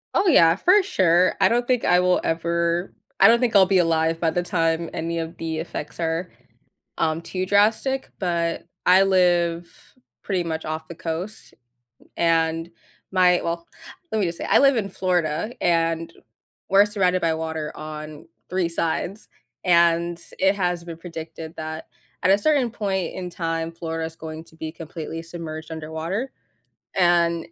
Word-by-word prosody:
Oh 400 - +3
yeah, 165 - +6
for 370 - +4
sure. 185 - +3
I - - +6
don't 240 +1 +1
think 250 -1 +1
I 180 0 +5
will 180 0 +2
ever 170 +2 -1 0.3
I 195 - +8
don't 235 +1 +5
think 240 -4 0
I'll 190 -2 +8
be 190 0 +2
alive 165 -1 +1
by 165 - +2
the 175 +2 -1
time 165 -1 0
any 165 +1 -3
of 165 0 -6
the 160 -1 -3
effects 155 -2 -6
are, 165 +1 -1 0.7
um, 160 0 0
too 185 +2 -3
drastic, 220 +7 +2
but 170 -3 -1 0.2
I 185 +2 +6
live 175 -3 +2 0.5
pretty 185 -3 -1
much 160 -1 -4
off 155 0 -4
the 170 - -7
coast, 175 +7 -6 0.6
and 165 0 +1 0.4
my, 180 -1 +4
well 170 0 -3 0.5
let 220 - +1
me, 200 - +2
just, 170 0 -5
say, - - -5
I - - +5
live 275 -2 +5
in 205 -3 -1
Florida, 180 +1 -1
and 165 -1 +1 0.6
we're 195 +1 +6
surrounded 185 -3 +1
by 165 -1 +2
water 160 -1 -4
on 155 0 -8 0.2
3 180 -1 0
sides, 170 +4 -3 0.4
and 170 -1 +3 0.2
it 195 +1 +4
has 180 -2 -1
been 170 -1 -7
predicted 165 -1 -8
that 160 0 -6 0.4
at 185 - +4
a 195 - +5
certain 270 -1 +2
point 195 -6 -2
in 180 -1 -5
time, 165 -1 -3
Florida 165 -1 -4
is 160 0 -7
going 160 -1 -7
to 160 - -20
be 160 -1 -6
completely 165 0 -7
submerged 165 -1 -8
underwater, 160 +10 -4 0.6
and 170 -2 +3
170 Hz, 165 wpm, -23 LUFS, 165-185 Hz, 0.7 s, I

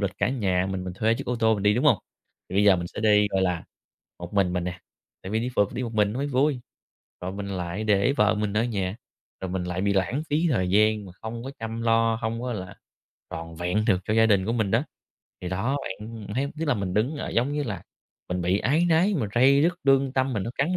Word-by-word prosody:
lịch 100 -2 0
cả - - +2
nhà 95 -8 0
mình, 95 -1 -3
mình 90 - -5
thuê 110 +3 +2
chiếc - - -6
ô 125 - -1
tô 110 -1 +3
mình 100 - -4
đi, 105 +1 +4
đúng 120 - 0
hông? - - +5 0.5
Thì 95 - -4
bây 105 - +4
giờ 100 -2 +6
mình 85 - -3
sẽ 85 - -7
đi, 105 -1 +4
gọi 95 -1 +1
là, 90 -3 0 0.5
một 85 +3 -8
mình 95 -3 +2
mình 90 -1 -1
nè, 90 0 -5 0.4
tại 95 - -6
vì 110 - +2
đi 120 - -2
phượt 100 -1 +2
đi 125 - -2
một 115 -2 -5
mình 105 -1 +2
nó 120 - -4
mới 140 - -1
vui. 135 0 +1 0.6
Rồi 90 +1 -3
mình 100 0 -5
lại 90 +1 -3
để 105 +4 +3
vợ 105 0 +4
mình 105 -1 -2
ở 115 - +3
nhà, 100 -5 -2 0.5
rồi 95 -1 -4
mình 95 -1 -2
lại 90 +1 -3
bị 100 0 +1
lãng 100 - 0
phí 155 +4 +2
thời 95 -6 +1
gian 105 +1 +3
mà 95 - -10
không 115 +1 -6
có 135 - -6
chăm 115 0 -4
lo, 115 0 +3
hông 115 +1 -2
có 125 0 -3
là 95 -4 -6 0.6
toàn 80 0 -7
vẹn 90 +5 0
được 95 -5 +3
cho 105 - 0
gia 115 0 +5
đình 100 -3 +3
của 115 - 0
mình 110 -4 0
đó. 115 +5 +3 0.6
Thì 90 - -3
đó, 115 +10 -1
bạn 105 +2 -7
thấy, 135 +3 0
tức - - 0
là, 145 - +3
mình 100 -4 -3
đứng 125 +9 +1
ở - - -4
giống 125 +5 +1
như 150 0 -1
là 100 - -4 0.5
mình 90 0 -2
bị 90 +3 +2
áy 150 +10 +2
náy, 175 +5 +3
mình 125 - -1
ray 135 +4 +5
rứt, 175 +3 +3
lương 135 -1 +3
tâm 130 0 +1
mình 105 - -1
nó 115 - -4
cắn 170 +7 +1
105 Hz, 265 wpm, -25 LUFS, 95-125 Hz, 0.6 s, giờ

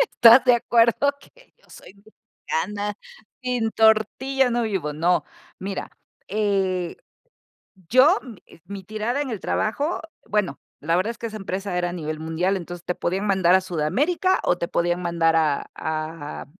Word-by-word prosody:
estás 250 - +7
de 250 - +6
acuerdo, 235 +4 +3
que - - -22
yo - - -28
soy - - -14
mexicana, 210 -1 -5 0.5
sin 245 -3 -1
tortilla 240 +5 +3
no 240 0 0
vivo. 190 -9 -2
No, 170 +4 +1 0.4
mira, 195 +1 -5 0.4
eh, 195 -4 0 0.9
yo, 280 - +6 0.5
mi 200 -1 -8
tirada 215 +7 -2
en 285 - -3
el 220 -5 -4
trabajo, 285 - -1 0.3
bueno, 200 -9 -1 0.2
la 165 +3 +1
verdad, 200 +5 0
es 230 - -12
que 230 - -4
esa 215 - -7
empresa 195 -2 -4
era 175 0 0
a - - -6
nivel 155 -3 -5
mundial, 165 +5 -1
entonces, 175 -1 -8
te 180 - -1
podían 190 +4 -2
mandar 190 -3 +4
a 190 - +4
Sudamérica, 250 - 0
o, 175 - +2
te 170 - -3
podían 175 +1 0
mandar 170 -2 +1
a 150 -3 0
a 155 -1 -5
195 Hz, 155 wpm, -23 LUFS, 175-230 Hz, 0.9 s, estás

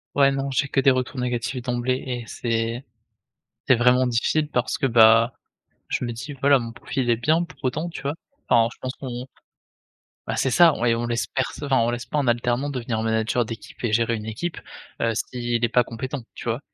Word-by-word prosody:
Ouais, 140 -1 +5
non 135 0 -2
j'ai 135 +2 0
que 135 - 0
des 135 0 +5
retours 130 0 0
négatifs 125 +1 -2
d'emblée 120 +1 -1
et 120 -2 -3
c'est 115 +2 -2 0.8
c'est 130 - +7
vraiment 125 +2 +4
difficile 145 +6 +1
parce 125 -3 -1
que, 140 - 0
bah, 115 0 +6 0.5
je - - -2
me 120 - -3
dis: 135 +6 -7
«Voilà 140 -1 +5
mon 115 -1 -6
profil 125 +1 -3
est 120 - +5
bien 155 +8 +2
pour 175 - -11
autant». 155 +7 -1
Tu 170 - -8
vois? 140 +1 -1 0.4
Enfin 115 -1 +5
je - - -14
pense 130 0 -4
qu'on 125 -2 -6 1.0
Bah - - -1
c'est 130 - +1
ça 170 +2 +6
et 115 -1 +3
on 120 +1 -2
laisse 120 0 -1
pers 130 - -1 0.2
enfin 135 -2 +2
on 115 0 +2
laisse 120 +1 -3
pas 150 +4 -1
un 140 - -1
alternant 120 +3 +1
devenir 120 -4 -2
manager 110 +1 +1
d'équipe 110 -1 -9
et 120 - 0
gérer 115 +1 +2
une 105 -1 -6
équipe, 160 +11 -4 0.4
heu, 115 -1 +1
si 120 +1 -2
il 115 - +2
est - - -2
pas 125 - +4
compétent, 130 +4 -5
tu - - -9
vois? 120 +2 -1
125 Hz, 215 wpm, -24 LUFS, 115-135 Hz, 1.0 s, c'est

